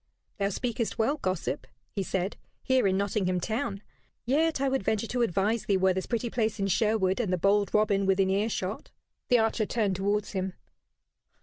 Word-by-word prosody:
"Thou 200 0 +1
speakest 230 +2 -2
well, 250 +7 +1
gossip," 185 - -2 0.2
he 200 - -2
said, 190 +1 -2 0.3
"here 260 -5 +3
in 190 0 +2
Nottingham 195 -2 0
town; 210 0 -3 0.4
yet 305 +5 +2
I 275 - +1
would 270 0 +1
venture 220 +2 0
to 245 +2 -2
advise 215 +1 +1
thee, 200 -2 +2
were 190 0 +3
this 190 0 -3
pretty 235 0 -1
place 225 -2 0
in 195 - +1
Sherwood 195 0 +2
and 215 -6 0
the 185 - +2
bold 200 +2 +2
Robin 200 -2 +2
within 190 0 +3
earshot." 200 -1 -2 0.4
The 245 - +6
archer 220 -1 +1
turned 210 -5 0
towards 205 +2 0
him. 190 -2 -2
205 Hz, 180 wpm, -28 LUFS, 190-230 Hz, 0.4 s, The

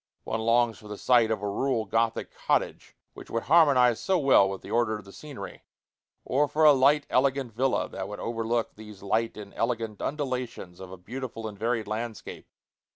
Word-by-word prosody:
One 110 - -3
longs 115 0 +2
for 105 - -13
the 105 -1 -7
sight 120 -1 +3
of 110 -3 -2
a - - -1
rural 115 +2 -1
Gothic 115 0 -1
cottage, - - -2 0.2
which - - -12
would 115 - -2
harmonize 135 -7 +4
so 190 -1 +1
well 135 - +5
with 95 -1 -6
the - - -9
order 115 -2 +1
of 105 - -13
the 100 - -13
scenery, 130 -11 -9 0.6
or 145 +3 +2
for 150 +2 0
a 150 - +9
light, 140 +2 +3
elegant 130 -2 +1
villa 130 +4 0
that - - -6
should - - -7
overlook 115 0 -2
these 105 -2 -12
light 110 +3 -1
and 100 -2 -10
elegant 115 -3 -2
undulations 130 - -4
of 95 -1 -10
a 95 - -9
beautiful 115 +3 -6
and 105 -2 -9
varied 115 -1 -1
landscape. 110 0 -6
115 Hz, 190 wpm, -27 LUFS, 110-130 Hz, 0.6 s, a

